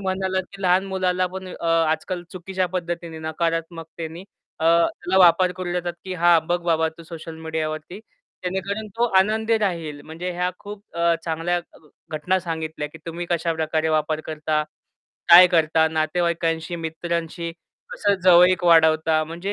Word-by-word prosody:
म्हणालात 190 Hz, -1 st, -1 dB
की 195 Hz, -, -10 dB
लहान 185 Hz, +1 st, +3 dB
मुलाला 185 Hz, -1 st, 0 dB
पण 190 Hz, +1 st, -7 dB
अ, -, -, -6 dB
आजकाल 165 Hz, +2 st, 0 dB
चुकीच्या 185 Hz, +1 st, -2 dB
पद्धतीने 170 Hz, -2 st, -5 dB
नकारात्मकतेने 165 Hz, +1 st, -4 dB, 0.3 s
त्याला 170 Hz, +2 st, +2 dB
अ, -, -, +6 dB
वापर 180 Hz, 0 st, +5 dB
करू 180 Hz, -1 st, -5 dB
देतात 175 Hz, -1 st, -2 dB
की 185 Hz, -1 st, -5 dB
हां, 175 Hz, -1 st, +5 dB
बघ 175 Hz, 0 st, 0 dB
बाबा 160 Hz, -1 st, +2 dB
तू -, -, -10 dB
सोशल 165 Hz, 0 st, -9 dB
मीडियावरती 160 Hz, +3 st, -4 dB, 0.4 s
जेणेकरून 195 Hz, +4 st, -3 dB
तो 235 Hz, -, +2 dB
आनंदी 220 Hz, +3 st, +2 dB
राहील 165 Hz, -8 st, -2 dB
म्हणजे 165 Hz, +3 st, -5 dB
ह्या 180 Hz, +1 st, -1 dB
खूप 205 Hz, 0 st, -9 dB
अ, 170 Hz, 0 st, +3 dB
चांगल्या 165 Hz, +2 st, -1 dB
घ 160 Hz, -, -22 dB, 0.3 s
घटना 180 Hz, +5 st, +1 dB
सांगितल्या 160 Hz, -3 st, -4 dB
की 160 Hz, -, -13 dB
तुम्ही 170 Hz, +1 st, -5 dB
कशा 170 Hz, -1 st, 0 dB
प्रकारे 160 Hz, 0 st, -1 dB
वापर 155 Hz, 0 st, 0 dB
करता, 155 Hz, 0 st, -1 dB, 0.7 s
काय 175 Hz, +2 st, +10 dB
करता, 160 Hz, -2 st, +3 dB
नातेवाईकांशी 165 Hz, +1 st, -1 dB
मित्रांशी 170 Hz, +1 st, -4 dB, 0.4 s
कसं 205 Hz, -1 st, +1 dB
जवळीक 180 Hz, 0 st, +6 dB
वाढवता 160 Hz, -1 st, +4 dB
म्हणजे 175 Hz, +5 st, -5 dB
170 Hz, 150 wpm, -23 LUFS, 160-180 Hz, 0.7 s, काय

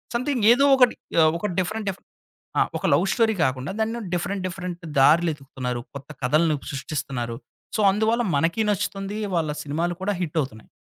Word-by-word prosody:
Something 250 Hz, -1 st, 0 dB
ఏదో 275 Hz, +3 st, +3 dB
ఒకటి 250 Hz, -2 st, +4 dB, 0.3 s
ఆహ్, 155 Hz, -, +5 dB
ఒక 210 Hz, -, -1 dB
డిఫరెంట్ 215 Hz, +3 st, -2 dB
డిఫ్ 195 Hz, -, -5 dB, 0.6 s
ఆ! -, -, +5 dB, 0.2 s
ఒక -, -, -5 dB
లవ్ -, -, +4 dB
స్టోరీ 225 Hz, -2 st, +3 dB
కాకుండా 130 Hz, +3 st, -1 dB
దాన్ని 225 Hz, +2 st, -1 dB
డిఫరెంట్ 185 Hz, +2 st, -2 dB
డిఫరెంట్ 180 Hz, -1 st, -6 dB, 0.2 s
దారులు 165 Hz, +5 st, +5 dB
ఎతుకుతున్నారు. 130 Hz, -4 st, -5 dB
కొత్త 140 Hz, +1 st, -9 dB
కథలను 155 Hz, +5 st, +3 dB, 0.2 s
సృష్టిస్తున్నారు. 135 Hz, -4 st, -4 dB, 0.4 s
సో, -, -, -3 dB
అందువల్ల 220 Hz, +4 st, +1 dB
మనకిీ 165 Hz, +9 st, +1 dB
నచ్చుతుంది. 200 Hz, +1 st, -3 dB, 0.2 s
వాళ్ళ 160 Hz, -3 st, 0 dB
సినిమాలు 165 Hz, +4 st, -2 dB
కూడా 205 Hz, +2 st, 0 dB
హిట్ 165 Hz, -2 st, -3 dB
అవుతున్నాయి. 110 Hz, -6 st, -8 dB
175 Hz, 160 wpm, -24 LUFS, 140-210 Hz, 0.6 s, ఆహ్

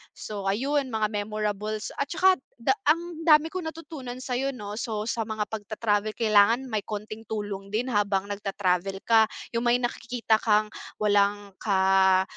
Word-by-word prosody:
So 200 Hz, -2 st, -6 dB
ayun, 270 Hz, +8 st, +1 dB
mga 215 Hz, -1 st, 0 dB
memorables 210 Hz, 0 st, -3 dB
at 280 Hz, -, 0 dB
tsaka 370 Hz, +2 st, +3 dB, 0.2 s
da 235 Hz, +3 st, +1 dB, 0.2 s
ang 335 Hz, +2 st, +1 dB
dami 310 Hz, 0 st, +6 dB
kong 365 Hz, -3 st, -4 dB
natutunan 300 Hz, -6 st, -7 dB
sa'yo 255 Hz, +1 st, -2 dB
'no. 210 Hz, -2 st, -6 dB
So, 220 Hz, -4 st, -2 dB
sa 225 Hz, 0 st, -2 dB
mga 215 Hz, -1 st, -1 dB
pagta-travel 215 Hz, 0 st, -1 dB
kailangan 230 Hz, +3 st, +3 dB
may 215 Hz, -, +1 dB
konting 215 Hz, +1 st, -6 dB
tulong 205 Hz, -2 st, -4 dB
din 225 Hz, +6 st, -2 dB
habang 200 Hz, -2 st, 0 dB
nagta-travel 195 Hz, -1 st, -1 dB
ka. 225 Hz, -1 st, +5 dB, 0.2 s
Yung 235 Hz, +1 st, -1 dB
may 240 Hz, -, +5 dB
nakikita 240 Hz, -2 st, 0 dB
kang 215 Hz, -1 st, +2 dB, 0.2 s
walang 205 Hz, -1 st, +1 dB
ka 190 Hz, -1 st, +4 dB
215 Hz, 150 wpm, -26 LUFS, 205-245 Hz, 0.2 s, dami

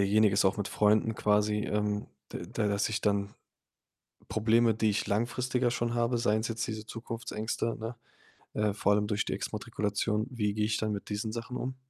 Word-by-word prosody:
jeniges 100 Hz, 0 st, +4 dB
auch 95 Hz, +5 st, +3 dB
mit 105 Hz, -, -2 dB
Freunden 105 Hz, +1 st, +3 dB
quasi 105 Hz, 0 st, +2 dB
ähm, 105 Hz, 0 st, 0 dB, 0.2 s
da 105 Hz, -2 st, -2 dB
dass 100 Hz, 0 st, +1 dB
ich 110 Hz, -1 st, -1 dB
dann 100 Hz, 0 st, +1 dB, 1.0 s
Probleme, 110 Hz, +2 st, +3 dB
die 110 Hz, 0 st, +2 dB
ich 100 Hz, -, -1 dB
langfristiger 120 Hz, +3 st, +1 dB
schon 120 Hz, -1 st, -1 dB
habe, 120 Hz, +1 st, +2 dB
seien's 110 Hz, -1 st, +1 dB
jetzt 115 Hz, +1 st, -2 dB
diese 110 Hz, -2 st, -5 dB
Zukunftsängste, 115 Hz, 0 st, -3 dB
ne, 115 Hz, +2 st, -4 dB, 0.6 s
äh, 105 Hz, -1 st, +1 dB
vor 105 Hz, 0 st, +2 dB
allem 105 Hz, 0 st, +2 dB
durch 105 Hz, 0 st, 0 dB
die -, -, -1 dB
Exmatrikulation 105 Hz, 0 st, -1 dB
wie 105 Hz, -4 st, 0 dB
gehe 105 Hz, 0 st, +1 dB
ich 105 Hz, 0 st, +1 dB
dann 110 Hz, -1 st, -1 dB
mit 100 Hz, -, -6 dB
diesen 105 Hz, +1 st, -2 dB
Sachen 120 Hz, +2 st, -4 dB
um? 130 Hz, +1 st, -3 dB
110 Hz, 175 wpm, -30 LUFS, 105-115 Hz, 1.0 s, jeniges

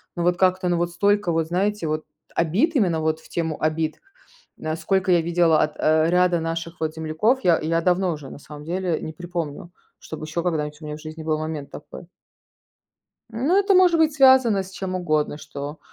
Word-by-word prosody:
Но 175 Hz, -, -2 dB
вот 175 Hz, 0 st, +2 dB
как-то, 185 Hz, -1 st, +2 dB
но 175 Hz, -, +1 dB
вот 175 Hz, 0 st, -1 dB
столько 200 Hz, 0 st, +1 dB
вот, 165 Hz, -1 st, 0 dB
знаете, 190 Hz, +1 st, -1 dB
вот, 155 Hz, 0 st, -2 dB, 0.3 s
обид 205 Hz, -, +1 dB
именно 175 Hz, -8 st, +1 dB
вот 155 Hz, 0 st, 0 dB
в -, -, -18 dB
тему 160 Hz, -2 st, -3 dB
обид, 155 Hz, 0 st, -1 dB, 0.6 s
а, 155 Hz, 0 st, -1 dB
сколько 185 Hz, +2 st, 0 dB
я 175 Hz, -, +4 dB
видела 165 Hz, -1 st, +3 dB
от, 150 Hz, 0 st, -2 dB
э, 155 Hz, +1 st, +3 dB
ряда 180 Hz, 0 st, +3 dB
наших 165 Hz, +1 st, -4 dB
вот 160 Hz, -1 st, -2 dB
земляков, 160 Hz, +11 st, +1 dB
я 175 Hz, -3 st, +4 dB
я 165 Hz, +2 st, 0 dB
давно 180 Hz, +1 st, +1 dB
уже, 145 Hz, -3 st, -9 dB
на -, -, -10 dB
самом 150 Hz, 0 st, -11 dB
деле, 175 Hz, -1 st, -2 dB
не 160 Hz, -, -6 dB
припомню, 170 Hz, -1 st, -6 dB, 0.3 s
чтобы 155 Hz, -1 st, -8 dB
еще 155 Hz, +2 st, -3 dB
когда-нибудь 150 Hz, -3 st, -2 dB
у -, -, -9 dB
меня 150 Hz, 0 st, -5 dB
в 155 Hz, -, -14 dB
жизни 155 Hz, 0 st, -8 dB
был 155 Hz, -1 st, 0 dB
момент 155 Hz, -3 st, -5 dB
такой. 170 Hz, -, -11 dB, 1.2 s
Ну, 270 Hz, -, +1 dB
это 400 Hz, 0 st, +3 dB
может 360 Hz, -2 st, +5 dB
быть 315 Hz, -2 st, +3 dB
связано 260 Hz, -7 st, +5 dB
с 190 Hz, -, -12 dB
чем 190 Hz, -1 st, -5 dB
угодно, 155 Hz, -5 st, 0 dB
что, 150 Hz, 0 st, -7 dB
170 Hz, 200 wpm, -23 LUFS, 155-185 Hz, 1.2 s, может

